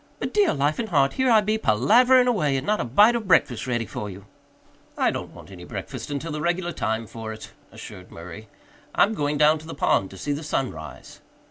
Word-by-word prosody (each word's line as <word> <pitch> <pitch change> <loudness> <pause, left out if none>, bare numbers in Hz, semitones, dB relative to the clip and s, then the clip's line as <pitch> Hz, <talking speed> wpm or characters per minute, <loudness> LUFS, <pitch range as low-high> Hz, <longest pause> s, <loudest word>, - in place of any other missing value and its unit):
But - - -5
dear 415 -3 +3
life 145 +2 0
and 225 -2 -3
heart! 140 -5 +2
Here 260 -1 +1
I 220 -2 +6
be 215 +1 -1
palavering 245 - +4
away 155 - +1
and 130 - -4
not 210 0 0
a - - -1
bite 205 - +4
of 225 -4 -3
breakfast 125 -9 +2
ready 120 -2 -1
for 105 0 -6
you!" 95 +1 -11 0.7
"I - - +2
don't - - -6
want - - -14
any - - -11
breakfast - - -7
until 145 +3 -4
the 150 0 -4
regular 175 +2 -1
time 110 -6 -2
for 110 0 -8
it," 110 0 -10 0.2
assured 90 0 -11
Murray. 90 +6 -10 0.5
"I'm 215 - +3
going 145 -6 -1
down 150 +1 +4
to 155 - -13
the 165 - -7
pond 95 - +1
to 95 - -12
see 145 - -4
the 145 +2 -3
sun 135 -4 -2
rise." 80 -2 -11
145 Hz, 225 wpm, -24 LUFS, -, 0.7 s, I